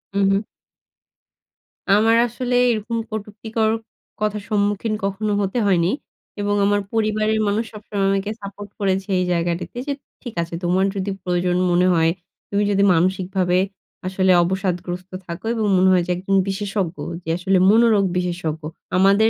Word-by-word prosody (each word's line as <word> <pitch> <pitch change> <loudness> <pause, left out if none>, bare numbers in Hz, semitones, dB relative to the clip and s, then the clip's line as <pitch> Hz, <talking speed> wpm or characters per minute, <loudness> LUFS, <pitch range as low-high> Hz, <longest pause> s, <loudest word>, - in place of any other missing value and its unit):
উ - - +2
হুম। 195 +1 +2 1.5
আমার 225 +2 +4
আসলে 245 +1 -2 0.2
এরকম 225 +1 -2
কটুক্তিকর 220 +1 -2 0.5
কথার 210 -1 -1
সম্মুখীন 205 +1 0
কখনো 200 +2 -1
হতে 200 +5 -1
হয়নি। 180 -2 +3 0.5
এবং 205 0 +1
আমার 205 0 +2
পরিবারের 215 0 +1
মানুষ 205 +3 +1
সবসময় 205 -2 -3
আমাকে 195 +1 -1
সাপোর্ট 200 +1 -8
করেছে 195 0 0
এই 180 - +1
জায়গাটিতে 170 +5 -2
যে, 285 - 0 0.3
"ঠিক 240 -4 -7
আছে, 170 - -10
তোমার 180 +2 +2
যদি 200 0 -2
প্রয়োজন 180 0 0
মনে 180 +1 +4
হয়, 165 -1 +3 0.4
তুমি 205 +1 +1
যদি 200 0 +3
মানসিকভাবে 180 +1 +1 0.5
আসলে 185 0 +2
অবসাদগ্রস্ত 180 0 -3
থাকো, 170 +4 -7
এবং 220 -2 0
মনে 185 +1 +5
হয় 180 -2 +4
যে - - 0
একজন 195 +2 -1
বিশেষজ্ঞ 195 -2 -2 0.3
যে 165 - -6
আসলে 190 +2 +2
মনোরোগ 220 -2 +5
বিশেষজ্ঞ। 175 -3 -2 0.4
আমাদের 200 +4 +5
195 Hz, 145 wpm, -21 LUFS, 180-210 Hz, 1.5 s, মনে